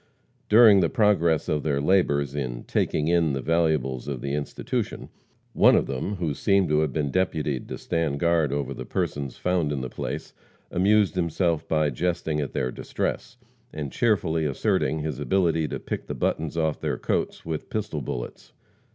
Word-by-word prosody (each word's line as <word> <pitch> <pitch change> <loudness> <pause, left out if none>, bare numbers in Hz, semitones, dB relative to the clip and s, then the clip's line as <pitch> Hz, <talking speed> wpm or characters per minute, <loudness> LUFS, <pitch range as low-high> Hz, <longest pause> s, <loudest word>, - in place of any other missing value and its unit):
During 110 -2 +8
the 85 -3 +2
progress 85 -7 +2
of 75 -1 0
their 70 -2 0
labors 70 -4 +2
in 65 -4 -4
"taking 75 - 0
in" 85 -3 +2
the 70 - -1
valuables 75 -5 0
of 70 -3 -3
the 70 0 -3
institution, 75 0 -3 0.4
one - - +6
of - - +2
them, 70 +10 -3
who 85 -5 -2
seemed 100 +3 +2
to 75 0 +3
have 80 -3 +1
been 70 -1 -1
deputied 75 -7 -1
to - - -5
stand 80 -4 -1
guard 85 -4 +2
over 70 -1 -2
the - - -6
persons 70 -3 -3
found 90 -4 0
in 70 -3 -2
the 65 -1 -5
place, - - -5 0.4
amused 100 +2 +3
himself 85 -2 0
by 75 -2 +1
jesting 80 -4 -1
at 70 - -4
their 65 - -1
distress, - - -4 0.3
and 75 -3 -5
cheerfully 85 -9 +1
asserting 75 +2 0
his 75 -4 -4
ability 85 -5 +1
to - - -4
pick - - -5
the - - -4
buttons 80 +1 -1
off 80 -2 0
their - - -1
coats - - -2
with 80 -2 -4
pistol 95 -8 -3
bullets. - - -6
80 Hz, 175 wpm, -25 LUFS, 70-85 Hz, 0.4 s, During